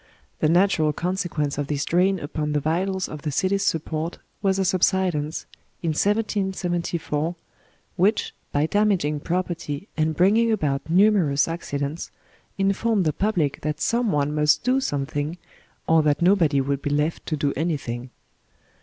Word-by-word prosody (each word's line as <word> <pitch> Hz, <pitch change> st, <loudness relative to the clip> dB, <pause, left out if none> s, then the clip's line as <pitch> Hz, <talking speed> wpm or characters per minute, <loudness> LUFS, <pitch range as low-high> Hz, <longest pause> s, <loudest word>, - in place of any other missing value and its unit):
The 155 Hz, -, +2 dB
natural 165 Hz, -3 st, +3 dB
conse 180 Hz, +3 st, -2 dB
quence 145 Hz, -2 st, -2 dB
of 145 Hz, -, -2 dB
this 145 Hz, -1 st, -1 dB
drain 185 Hz, +3 st, +2 dB
upon 150 Hz, 0 st, -3 dB
the 150 Hz, -, +2 dB
vitals 185 Hz, +5 st, -1 dB
of 150 Hz, -, -8 dB
the 150 Hz, -, -3 dB
city's 195 Hz, +7 st, +1 dB
support 160 Hz, -1 st, -2 dB, 0.2 s
was 195 Hz, -1 st, +2 dB
a 190 Hz, -, +1 dB
subsidence, 180 Hz, -4 st, +1 dB, 0.4 s
in 165 Hz, -, 0 dB
1774, 175 Hz, -4 st, -1 dB, 0.6 s
which, 205 Hz, +4 st, +2 dB, 0.2 s
by 145 Hz, +1 st, +2 dB
damaging 185 Hz, -6 st, +1 dB
property 170 Hz, -1 st, -3 dB
and 155 Hz, 0 st, 0 dB
bringing 215 Hz, +7 st, +4 dB
about 150 Hz, -8 st, -1 dB
numerous 180 Hz, -6 st, +4 dB
accidents, 150 Hz, -2 st, -4 dB, 0.5 s
informed 195 Hz, +1 st, +1 dB
the 155 Hz, -, +1 dB
pub 210 Hz, +4 st, -1 dB
lic 145 Hz, -4 st, 0 dB
that 150 Hz, 0 st, -2 dB
some 235 Hz, -2 st, +1 dB
one 145 Hz, 0 st, 0 dB
must 150 Hz, -1 st, +3 dB
do 255 Hz, +2 st, +2 dB
something, 145 Hz, -, -2 dB, 0.5 s
or 160 Hz, 0 st, +5 dB
that 150 Hz, -1 st, +2 dB
nobody 170 Hz, -7 st, +4 dB
would 140 Hz, +1 st, -1 dB
be -, -, -2 dB
left 150 Hz, +3 st, -1 dB
to 155 Hz, -, -1 dB
do 140 Hz, -1 st, 0 dB
anything. 130 Hz, -6 st, -3 dB
165 Hz, 150 wpm, -24 LUFS, 150-190 Hz, 0.6 s, or